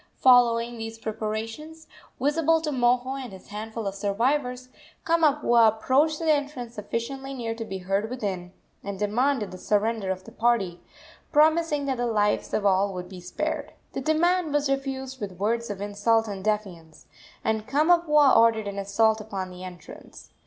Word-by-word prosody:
Following 240 -2 +4
these 225 0 -6
preparations, 225 +9 -5 0.3
visible 320 +4 +2
to 305 -2 -2
Moho 255 +1 +1
and 245 - -8
his 190 -1 -13
handful 220 +2 -6
of 195 +1 -5
warriors, 255 0 0 0.4
Kamapuaa 295 -8 +4
approached 265 +8 +2
the 320 -1 +1
entrance 285 -5 -2
sufficiently 265 +6 -5
near 230 -3 -3
to 225 0 -6
be 195 -3 -5
heard 195 +4 -1
within, 195 -8 -4 0.3
and 200 -1 -5
demanded 215 +1 0
the 185 - -9
surrender 210 0 0
of 185 0 -3
the - - -12
party, 205 -7 0 0.5
promising 310 -1 +3
that 265 -2 -1
the 245 0 -1
lives 210 -2 +1
of 205 - -1
all 195 0 +2
would 180 0 -6
be 185 -2 -10
spared. 180 +1 -4 0.2
The - - -3
demand 330 +3 +2
was 290 -1 +1
refused 265 -1 -3
with 200 -3 -4
words 225 +5 -1
of 200 -1 -5
insult 215 +2 +1
and 195 -2 -6
defiance, 190 -7 -3 0.4
and 220 -1 -1
Kamapuaa 300 -1 +4
ordered 225 -2 +4
an 200 0 -4
assault 215 +2 +2
upon 195 -3 -5
the 180 0 -10
entrance. 180 -1 -11
230 Hz, 160 wpm, -26 LUFS, 205-275 Hz, 0.5 s, Following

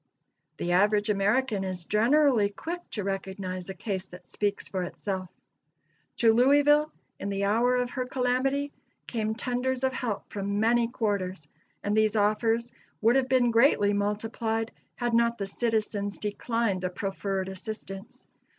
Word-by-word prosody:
The 175 - -2
average 205 +3 +3
American 210 +1 +1
is 185 -2 -4
generally 235 - +4
quick 335 - -5
to 210 - -3
recognize 190 -1 -4
a 190 - -5
case 190 -3 -4
that 180 0 -13
speaks 205 -1 -2
for 190 - -3
itself. 185 +1 -4 0.9
To 225 -1 +5
Louisville, 290 +5 +5 0.3
in 200 - -3
the 200 0 -1
hour 230 +5 +3
of 250 -1 0
her 255 -1 -3
calamity, 265 +3 0 0.3
came 220 -2 -2
tenders 250 +2 -1
of 260 0 +2
help 235 -5 -3
from 200 0 -2
many 230 +2 +3
quarters, 200 - -2 0.4
and 205 +1 0
these 215 0 +3
offers 225 +3 +1 0.3
would 230 +3 +4
have 265 -1 +2
been 250 -2 +4
greatly 225 -4 +4
multiplied, 220 +2 -1 0.2
had 240 -1 -2
not 235 0 +3
the 200 - -2
citizens 210 -1 -1
declined 210 -1 -1
the 185 - -1
proffered 195 0 -3
assistance. 195 0 -7
215 Hz, 145 wpm, -28 LUFS, 200-245 Hz, 0.9 s, To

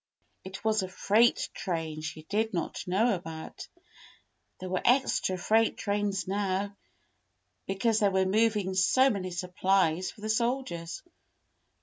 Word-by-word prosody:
It 190 +3 -9
was 215 -1 +2
a 185 - -3
freight 215 +5 +2
train 160 -3 -3
she 155 0 -6
did 215 +4 -1
not 170 - -4
know 205 +6 +2
about. 165 -3 -7 0.9
There 185 - -6
were 185 0 -1
extra 250 -7 +2
freight 220 +5 +2
trains 200 -1 -1
now, 200 0 -1 0.9
because 215 +3 +1
they 205 - +4
were 190 -1 +2
moving 210 -1 +1
so 255 +8 +4
many 190 -4 -3
supplies 180 -1 +1
for 215 - -13
the 215 - -4
soldiers. 220 -8 -2
195 Hz, 130 wpm, -29 LUFS, 185-220 Hz, 0.9 s, they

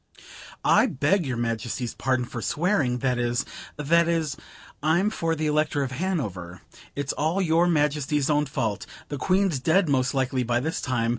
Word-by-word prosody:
I - - +5
beg 150 +5 +1
your 125 -2 -2
Majesty's 115 +1 -2
pardon 130 -2 0
for 120 0 -6
swearing; 150 - +1
that 125 -2 +1
is 120 +2 0 0.3
that 165 +3 +3
is 160 -4 0 0.5
I'm 170 +7 +2
for 165 -6 -1
the 155 0 -2
Elector 150 -1 +1
of 130 - -4
Hanover. 105 - -3 0.3
It's 140 -1 -2
all 160 +5 0
your 170 -1 +3
Majesty's 150 -3 +1
own 150 -1 +2
fault. 110 -6 -2 0.2
The 145 - -4
Queen's 185 -2 +1
dead 170 +7 +3
most 135 -1 +1
likely 130 -1 0
by 120 0 +1
this 160 +6 -2
time. 120 -4 0
145 Hz, 165 wpm, -25 LUFS, 125-165 Hz, 0.5 s, I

